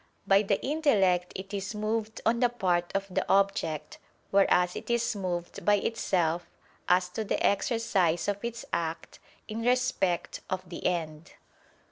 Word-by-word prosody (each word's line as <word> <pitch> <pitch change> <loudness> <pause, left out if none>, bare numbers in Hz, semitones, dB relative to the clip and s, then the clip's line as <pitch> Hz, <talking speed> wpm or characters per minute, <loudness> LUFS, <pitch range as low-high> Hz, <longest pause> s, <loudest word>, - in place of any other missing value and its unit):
By 195 0 +5
the 200 -1 0
intellect 205 - +2
it 195 +2 -7
is 200 +1 -3
moved 220 +1 -2
on 235 +1 +3
the 245 -1 +4
part 180 -7 0
of 195 0 0
the - - +1
object: 165 -6 +1 0.3
whereas 180 -2 +3
it - - -7
is 235 -1 +1
moved 175 -3 -4
by 205 - +5
itself, 175 -5 0 0.4
as 180 0 +4
to 220 +5 -3
the 205 - -1
exercise 200 -6 +1
of 205 +1 -2
its 235 0 -4
act, 165 0 -3 0.3
in 220 +1 -4
respect 245 -7 0
of 185 0 -3
the 175 - -3
end. 160 -2 -3
195 Hz, 150 wpm, -29 LUFS, 175-225 Hz, 0.4 s, By